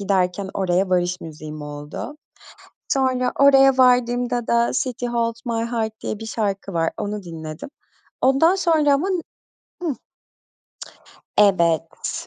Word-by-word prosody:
giderken 190 -1 0
oraya 190 0 +1
varış 180 0 +1
müziğim 155 -1 -8
oldu. 145 - -7 0.8
Sonra 255 -2 +1
oraya 270 -1 +6
vardığımda 245 -1 +2
da 235 0 +2
City 245 -1 -4
Holds 230 0 -2
My 230 -1 -1
Heart 220 -2 -1
diye 210 - -4
bir 225 - -7
şarkı 200 -3 -3
var, 165 -1 +1
onu 210 -1 -4
dinledim. 160 - -8 0.5
Ondan 275 +7 +4
sonra 320 -6 +3
ama 310 +8 0
n 365 -3 0 0.6
hıh. 310 -6 -1 1.4
Evet, 170 -5 +1
225 Hz, 120 wpm, -22 LUFS, 180-255 Hz, 1.4 s, oraya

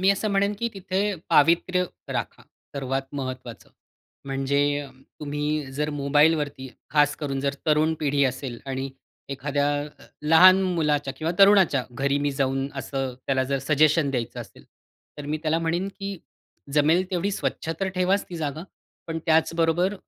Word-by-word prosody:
मी 190 +1 +5
असं 200 +2 0
म्हणेन, 200 +1 +2
की 235 - -1
तिथे 195 +2 -1
पावित्र्य 170 +3 +3 0.3
राखा - - -4 0.3
सर्वात 135 0 -3
महत्त्वाचं. 130 -3 -6 0.5
म्हणजे 140 +1 0
अ, 140 -2 -9 0.3
तुम्ही 150 0 -2
जर 150 +3 -2
मोबाईलवरती 145 -1 +1 0.2
खास 145 -1 +3
करून, 140 -3 -3
जर 140 +1 -1
तरुण 155 +1 +3
पिढी 145 -1 +1
असेल 130 -2 -3
आणि 135 0 -3 0.4
एखाद्या 140 +1 -1 0.6
लहान 185 +4 +8
मुलाच्या 150 -6 0
किंवा 160 +4 -2
तरुणाच्या 195 -9 +5
घरी 140 +3 0
मी 145 0 0
जाऊन 135 0 -1
असं 135 -1 -3
त्याला 130 -1 +1
जर 135 +1 -1
सजेशन 150 +2 +3
द्यायचं 120 -4 -3
असेल, - - -12 0.5
तर 145 - -6
मी 155 +1 -2
त्याला 160 0 +1
म्हणेन, 170 +3 -1
की 195 -1 -6 0.5
जमेल 155 +5 +3
तेवढी 185 +2 0
स्वच्छ 175 -4 -3
तर 195 - 0
ठेवाच 185 +2 +1
ती 175 - -6
जागा. 155 0 -3 0.4
पण 165 0 -3
त्याचबरोबर 165 +3 +2
150 Hz, 145 wpm, -25 LUFS, 140-170 Hz, 0.6 s, लहान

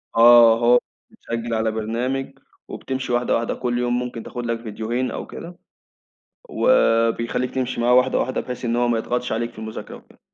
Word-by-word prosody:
آه 115 0 +7
هو 120 +1 +5 0.3
بتسجّل 115 0 -5
على 110 0 0
برنامج 125 +5 -3 0.3
وبتمشِي 130 -2 -4
واحدة 120 +1 +1
واحدة 115 0 -1
كُلّ 120 -1 -2
يوم 120 0 0
ممكن 125 -2 -5
تاخد 120 -1 -6
لك 115 -1 -2
فيديوهين 115 +3 -3
أو - - -6
كده. 175 +1 -10 0.9
وبيخلّيك 115 - +2
تمشِي 130 -2 -2
معاه 120 +1 +3
واحدة 125 0 +3
واحدة 130 - -1
بحيث 125 0 -7
إن 120 0 0
هو 120 0 +1
ما 115 -1 +1
يضغطش 125 +1 -2
عليك 115 +1 -2
في - - -17
المذاكرة 110 0 -7
وكده. - - -20
120 Hz, 175 wpm, -22 LUFS, 115-125 Hz, 0.9 s, آه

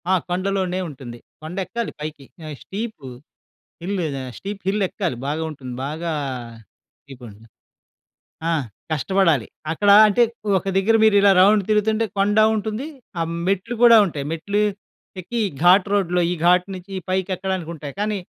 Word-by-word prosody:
ఆ! - - +4 0.2
కొండలోనే 185 0 -1
ఉంటుంది. 125 -4 -10 0.2
కొండెక్కాలి 185 +8 -4
పైకి. 150 -2 -7 0.2
ఆహ్, 155 -1 -6
స్టీపు 210 - -6 0.8
హిల్లు 190 0 -2 0.2
ఆహ్, 130 -1 -7
స్టీప్ 200 0 -7
హిల్లెక్కాలి 195 -5 -1
బాగా 155 +3 -2
ఉంటుంది. 130 -4 -8
బాగా 160 +4 -4 1.0
ఈ - - -6
కొండ 110 -4 -11 1.1
ఆ! - - +2 0.4
కష్టపడాలి. 160 - +2 0.3
అక్కడా 200 +5 +4
అంటే, 210 +3 +2 0.4
ఒక 190 - -5
దగ్గర 210 +4 +3
మీరిలా 205 -2 +5
రౌండ్ 205 +2 +5
తిరుగుతుంటే 215 +1 +2
కొండా 205 +2 +3
ఉంటుంది. 220 +6 -3 0.3
ఆహ్, 165 0 -1 0.2
మెట్లు 200 +5 -1
గూడా 235 -1 +8
ఉంటాయి. 150 -6 -5
మెట్లు 200 +6 -1 0.6
ఎక్కి 235 +6 -3 0.2
ఘాట్ 185 +3 +6
రోడ్‌లో, 180 -3 +1
ఈ - - +1
ఘాట్ 180 0 +4
నించి 190 +2 -9
పైకెక్కడానికుంటాయి. 185 -5 -3
కానీ 210 -1 -1
190 Hz, 130 wpm, -21 LUFS, 160-205 Hz, 1.1 s, గూడా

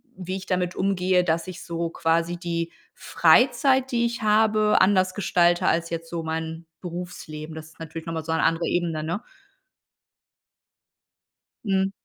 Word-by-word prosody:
wie 185 0 -4
ich 190 - -8
damit 180 -1 -1
umgehe, 185 -1 +2
dass 165 0 0
ich 180 -1 -8
so 170 -1 -3
quasi 170 +1 0
die 170 -1 -3 0.2
Freizeit, 265 -2 +3
die 235 -1 +2
ich 235 -1 -3
habe, 215 0 +3
anders 185 -1 +3
gestalte 175 -3 +2
als 170 0 +1
jetzt 165 0 -5
so 170 -1 -2
mein 160 +1 -4 0.2
Berufsleben? 170 -3 -7
Das 160 - -7
ist 160 - -20
natürlich 165 0 -7
noch 165 - -3
mal 160 - -3
so 160 - -3
'ne 160 - +1
andere 165 +1 +1
Ebene, 165 -3 -1
ne? 170 +8 -3 2.4
Mhm. 195 -2 +1
175 Hz, 155 wpm, -24 LUFS, 165-190 Hz, 2.4 s, Freizeit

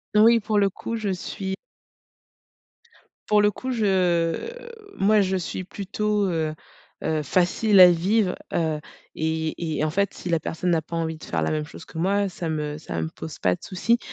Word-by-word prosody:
Oui, 230 +2 +7
pour 210 0 -1
le 200 -2 +3
coup 230 - -5
je 215 -3 -2
suis 190 +1 -4 1.8
pour 210 0 +5
le 210 - +4
coup 255 +6 -6
je, 180 -7 +2 0.6
moi, 210 +1 +4
je 190 0 +1
suis 185 +1 -4
plutôt, 205 +2 -1
heu, 160 -2 -1 0.5
heu, 155 -1 0
facile 185 +6 +3
à 180 -1 +10
vivre, 190 +3 +2 0.2
heu. 160 -2 0 0.3
Et 160 0 -2
et - - +1
en 155 - 0
fait, 200 +2 0
si 175 - -6
la 165 - +2
personne 175 +3 -2
n'a 165 -1 +2
pas 165 +2 -7
envie 160 -1 -2
de - - -15
faire 80 -2 -1
la - - 0
même 155 -1 0
chose 165 - -11
que 160 - -8
moi, 200 +3 +2
ça 175 -3 -5
me 150 -1 -3
ça 85 - -5
me 80 - -1
pose 160 - -8
pas 90 -1 +2
de - - -21
souci. 230 +6 +1
180 Hz, 190 wpm, -24 LUFS, 160-205 Hz, 1.8 s, à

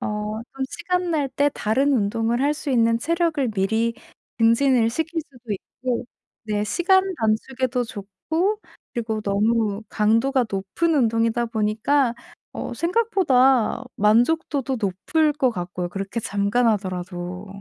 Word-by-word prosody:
어 210 +1 -3
또 270 -1 -2
시간 360 -1 -1
날 295 -4 0
때 285 +2 +1
다른 265 +7 +1
운동을 230 +1 +1
할 290 +2 +2
수 295 -1 -5
있는 230 -2 +3
체력을 325 -2 0
미리 220 +3 0 0.4
증진을 230 +1 +4
시킬 325 +5 -2
수도 240 -4 -7
있고 240 +5 -4 0.4
네 210 -1 -1
시간 375 - +3
단축에도 245 +2 0
좋고 230 - -2 0.4
그리고 220 -2 -2
너무 210 +1 +1
강도가 230 +5 +2
높은 200 - 0
운동이다 230 -2 +2
보니까 230 +4 +1 0.4
어 - - -5
생각보다 270 - +2
만족도도 260 +5 +2
높을 255 - +1
것 260 -3 +2
같고요 180 -3 -4
그렇게 195 +5 -4
잠깐 205 +4 +1
하더라도. 180 -2 -3
230 Hz, 270 characters per minute, -23 LUFS, 210-280 Hz, 0.4 s, 증진을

